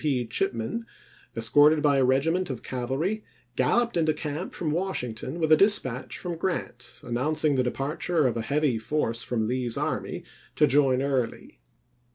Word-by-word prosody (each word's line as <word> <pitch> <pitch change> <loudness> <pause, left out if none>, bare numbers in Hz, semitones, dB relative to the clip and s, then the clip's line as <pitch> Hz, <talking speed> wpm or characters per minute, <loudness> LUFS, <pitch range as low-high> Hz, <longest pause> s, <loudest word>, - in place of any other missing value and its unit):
P. 135 -5 +1
Chipman, 115 - -2 0.5
escorted 145 +7 +4
by 145 -2 +4
a 135 - +3
regiment 160 +8 +1
of 130 -4 -5
cavalry, 135 - -2 0.3
galloped, 235 - +2
into 155 -2 +2
camp 150 +4 -4
from 155 -3 -2
Washington 150 -6 -3
with 160 -1 0
a - - +10
dispatch 155 - +2
from 175 -2 -5
Grant 180 +1 -4
announcing 150 +5 +1
the 130 - +2
departure 145 +5 -1
of 125 - +1
a 115 - -1
heavy 140 -1 0
force 115 -2 -1
from 115 -3 -1
Lee's 125 0 -1
army - - -3 0.3
to - - +5
join 135 -1 +3
Early. 130 -4 -2
140 Hz, 155 wpm, -26 LUFS, 125-160 Hz, 0.5 s, a